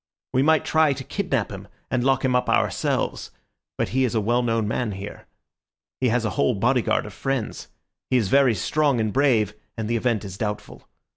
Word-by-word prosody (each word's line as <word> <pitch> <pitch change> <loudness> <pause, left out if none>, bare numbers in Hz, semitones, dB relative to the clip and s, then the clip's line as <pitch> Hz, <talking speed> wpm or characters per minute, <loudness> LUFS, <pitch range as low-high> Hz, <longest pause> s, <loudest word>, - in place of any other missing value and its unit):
We 130 - +3
might 160 +2 +3
try 155 -2 +3
to 135 0 -7
kidnap 135 - -2
him, 95 0 -8 0.2
and 130 -2 +1
lock 135 0 +2
him 125 -1 +2
up 125 - +1
ourselves; - - 0 0.5
but - - -1
he 130 +1 +1
is 125 -2 0
a - - +3
well 120 +4 +1
known 115 -3 0
man 110 0 -1
here. 95 +2 -8 0.7
He 130 - +2
has 120 0 +1
a 110 - -1
whole 70 -5 +1
bodyguard 120 +4 +1
of 105 - -9
friends; 135 -3 -3 0.4
he 130 - +3
is 110 -5 +1
very 135 -1 +4
strong 140 - +1
and 110 -2 -1
brave, 120 -7 +2 0.2
and 110 -1 -3
the 115 +1 0
event 115 -3 0
is 95 0 -8
doubtful. 105 -1 -5
120 Hz, 200 wpm, -24 LUFS, 105-135 Hz, 0.7 s, very